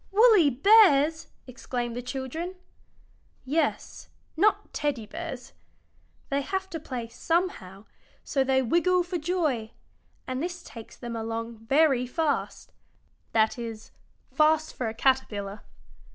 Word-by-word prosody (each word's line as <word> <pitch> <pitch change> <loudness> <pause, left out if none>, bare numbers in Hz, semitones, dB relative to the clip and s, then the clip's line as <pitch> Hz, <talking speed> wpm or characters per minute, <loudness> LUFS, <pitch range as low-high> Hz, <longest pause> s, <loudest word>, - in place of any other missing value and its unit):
"Woolly 415 -6 +6
bears!" 320 - +5 0.2
exclaimed 245 -2 -4
the 245 - -3
children. 270 +8 -5 0.9
"Yes; 305 +5 -2 0.3
not 405 +7 +2
Teddy 285 -7 -2
bears. 315 -1 -7 0.8
They 280 0 0
have 380 +6 -3
to 325 - -4
play 250 -6 -5
somehow, 230 - -2 0.4
so 270 -2 0
they 265 0 +2
wiggle 350 +7 +2
for 350 0 -4
joy, 300 -9 -1 0.5
and 255 +1 -3
this 350 +1 -4
takes 230 -2 -11
them 235 -1 -6
along 225 0 -4
very 270 -3 +3
fast 310 +3 -2 0.6
that 220 +1 +2
is, 225 -2 -7 0.4
fast 310 0 +2
for 245 - -2
a 220 - -7
caterpillar. 215 -6 0
270 Hz, 120 wpm, -27 LUFS, 235-330 Hz, 0.9 s, Woolly